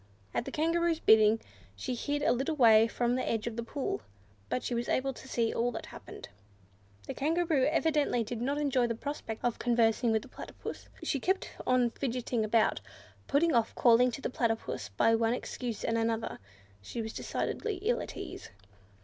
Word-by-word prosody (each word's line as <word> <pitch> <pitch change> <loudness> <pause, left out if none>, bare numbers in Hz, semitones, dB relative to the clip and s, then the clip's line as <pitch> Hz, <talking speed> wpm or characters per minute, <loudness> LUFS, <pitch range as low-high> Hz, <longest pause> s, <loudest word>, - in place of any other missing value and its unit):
At - - -1
the 275 - -5
Kangaroo's 330 +2 +1
bidding, 220 -2 +5 0.4
she 100 - -4
hid 290 +4 -2
a - - +4
little 270 +6 0
way 225 -4 +6
from 240 +1 0
the 255 - -1
edge 225 -2 -1
of 235 -2 -3
the 235 - -2
pool, 260 +4 -3 0.5
but 125 - -1
she - - -2
was 235 0 -2
able 270 +1 +1
to 265 - -12
see 230 -3 0
all 240 +1 +1
that - - -5
happened. - - -10 0.8
The - - -5
Kangaroo 320 -2 +1
evidently 300 -6 +2
did 230 +1 -5
not 275 +4 0
enjoy 270 -4 +2
the 230 - -2
prospect 235 -3 -5
of 240 - 0
conversing 235 -1 +2
with 220 -1 +1
the - - -12
Platypus. - - -8
She 275 - 0
kept 380 +7 0 0.2
on 250 -2 +3
fidgeting 245 -3 -2
about, 215 +1 +2 0.5
putting 315 +4 +3
off 230 -2 +1
calling 245 +1 +5
to 275 - -6
the - - -3
Platypus 225 - -2
by 105 - +3
one 225 +1 +2
excuse 245 -3 -5
and 230 0 +1
another: 225 0 -1 0.4
she 100 - -7
was 220 -1 -4
decidedly 435 -3 -2
ill 475 +3 +1
at - - -7
ease. - - -7
240 Hz, 185 wpm, -31 LUFS, 225-280 Hz, 0.8 s, way